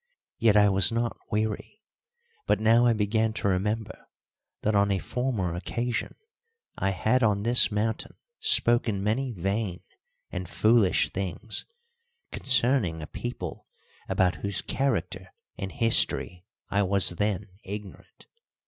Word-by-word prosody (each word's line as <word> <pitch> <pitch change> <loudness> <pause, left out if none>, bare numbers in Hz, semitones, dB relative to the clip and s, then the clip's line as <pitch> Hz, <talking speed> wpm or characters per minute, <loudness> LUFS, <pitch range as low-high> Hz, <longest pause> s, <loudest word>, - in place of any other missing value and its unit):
Yet 110 -2 +4
I 105 0 +6
was 95 +1 +3
not 115 0 -1
weary, 110 - -3 0.7
but - - +2
now 115 +2 +4
I 120 - +4
began 110 +1 0
to 105 - -2
remember 105 +3 -2 0.6
that 110 - +1
on 100 0 +3
a 100 - +1
former 110 -6 -2
occasion 120 +7 -3 0.6
I 95 - 0
had 110 +7 +1
on 105 -3 +2
this 120 +1 +3
mountain 110 +2 -2 0.2
spoken 120 - +2
many 125 +5 0
vain 100 -1 -2 0.5
and 90 -2 -5
foolish 110 -4 +3
things 100 +3 -3 0.6
concerning 120 - +2
a - - -4
people 65 - -6 0.4
about 90 0 +1
whose 100 -2 -3
character 95 -9 -2 0.2
and 95 0 -5
history 90 -5 +2 0.3
I 100 - +2
was 95 -2 +4
then 100 +2 -2
ignorant. 100 0 -9
105 Hz, 125 wpm, -27 LUFS, 95-115 Hz, 0.7 s, I